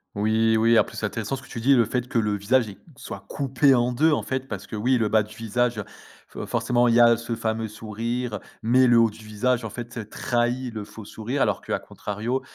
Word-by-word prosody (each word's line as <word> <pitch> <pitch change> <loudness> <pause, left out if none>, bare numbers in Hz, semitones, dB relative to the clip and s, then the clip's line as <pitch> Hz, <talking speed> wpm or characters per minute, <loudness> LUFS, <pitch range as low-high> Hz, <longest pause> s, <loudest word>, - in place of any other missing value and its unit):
Oui, 110 +2 +2
oui 115 +1 +4
après 110 - +1
c'est 110 - -2
intéressant 115 +5 -3
ce - - -10
que - - -15
tu 115 - -6
dis 140 +3 +5
le 120 -4 +4
fait 125 +2 -3
que 115 - +1
le 105 -1 0
visage 110 +4 +2
est 100 - -10 0.2
soit 110 -7 -8
coupé 135 0 +2
en 120 0 +2
2. 155 +6 +3
En - - +1
fait, 130 0 -3
parce 100 -3 -6
que - - -7
oui, 125 +4 +2
le 110 -2 +1
bas 110 0 +3
du 105 +1 -13
visage, 115 +2 -1
heu, 105 - -4 0.4
fo - - -7
forcément, 120 0 +1
il 115 - +3
y - - +5
a 120 0 +7
ce 115 +1 -5
fameux 110 -1 -2
sourire, 115 +1 -4 0.2
mais 125 +3 +4
le 120 -1 +6
haut 115 -1 +5
du 110 +1 -14
visage, 115 +4 0
en 110 - -4
fait, 115 -2 -7
trahi 120 0 -1
le 110 -2 -5
faux 105 0 -11
sourire. 120 +7 -4
Alors - - +1
qu'à - - -2
contrario, 110 +6 -4
115 Hz, 245 wpm, -24 LUFS, 110-125 Hz, 0.4 s, a